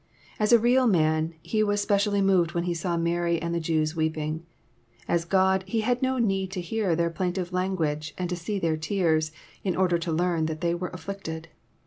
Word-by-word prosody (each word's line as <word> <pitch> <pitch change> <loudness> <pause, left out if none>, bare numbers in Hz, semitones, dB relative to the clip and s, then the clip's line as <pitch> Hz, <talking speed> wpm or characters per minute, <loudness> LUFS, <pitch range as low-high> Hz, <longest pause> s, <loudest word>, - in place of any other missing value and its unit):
As 215 +1 +2
a 235 - +9
real 245 +2 +4
roan, 160 -2 +2
He 215 - 0
was 205 -1 +1
specially 205 0 +2
moved 180 -3 +3
when 170 - +1
He 175 0 -1
saw 170 +1 -2
Mary 170 0 +1
and 170 +1 -3
the 170 - 0
Jews 155 -1 0
weeping. 160 0 -2 0.6
As 170 -1 +1
God, 190 +1 +3
He 220 +3 0
had 245 +3 0
no 260 0 +1
need 195 -5 +1
to 190 - -3
hear 185 0 0
their 170 0 0
plaintive 180 +1 -2
language, 160 -5 -1
and 180 - -2
to 180 - -2
see 175 +4 -3
their 165 -4 0
tears, 155 -2 +1 0.3
in 185 -3 0
order 180 -2 +2
to 165 0 -3
learn 165 -1 +1
that 155 -1 -5
they 170 -1 +1
were 180 +1 -3
afflicted. 175 -4 -6
175 Hz, 200 wpm, -26 LUFS, 165-195 Hz, 0.6 s, a